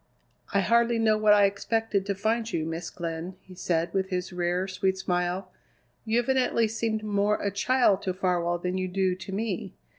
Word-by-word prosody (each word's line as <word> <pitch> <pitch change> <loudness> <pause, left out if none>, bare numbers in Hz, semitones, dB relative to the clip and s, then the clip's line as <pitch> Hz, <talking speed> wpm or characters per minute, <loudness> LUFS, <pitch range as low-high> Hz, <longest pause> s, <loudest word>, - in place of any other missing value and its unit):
"I 200 - +3
hardly 235 +3 +3
know 220 -1 +3
what 215 -1 +5
I 205 -1 +6
expected 200 0 -1
to 200 - 0
find 225 +3 -1
you, 160 -1 -1
Miss 165 +1 -4
Glenn," 170 +1 -5
he 190 - -14
said 170 -2 -1
with 190 -1 0
his 180 -1 -3
rare, 180 +1 0
sweet 190 0 0
smile. 180 0 -2 0.5
"You 225 +1 +1
evidently 250 -2 +2
seemed 220 0 -2
more 205 0 +1
a 200 - -1
child 205 0 +2
to 185 - -2
Farwell 175 -2 0
than 180 +2 -2
you 185 - -1
do 185 0 +1
to 190 +1 -8
me. 200 -1 -3
195 Hz, 185 wpm, -27 LUFS, 180-220 Hz, 0.5 s, I